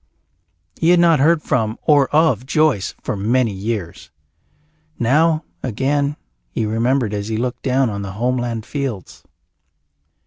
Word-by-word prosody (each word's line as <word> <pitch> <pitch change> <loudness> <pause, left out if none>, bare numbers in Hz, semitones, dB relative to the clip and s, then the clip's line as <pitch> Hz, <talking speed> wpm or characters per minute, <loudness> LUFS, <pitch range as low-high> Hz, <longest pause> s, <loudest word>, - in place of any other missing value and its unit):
He 165 - +2
had 175 0 +5
not 165 -3 +4
heard 155 +3 +3
from 110 -2 -1
or 145 -3 +4
of 155 -4 +2
Joyce 155 - +1
for - - -2
many 115 +4 +1
years. 100 -3 -5 0.9
Now, 155 +6 +2 0.2
again, 140 +4 -1 0.3
he 110 - -2
remembered 115 +1 0
as 100 0 -3
he 110 -1 -2
looked 125 +1 -3
down 130 0 +1
on 100 0 -4
the 95 -1 -6
homeland 120 0 -2
fields. 135 - -5
125 Hz, 135 wpm, -19 LUFS, 110-145 Hz, 0.9 s, had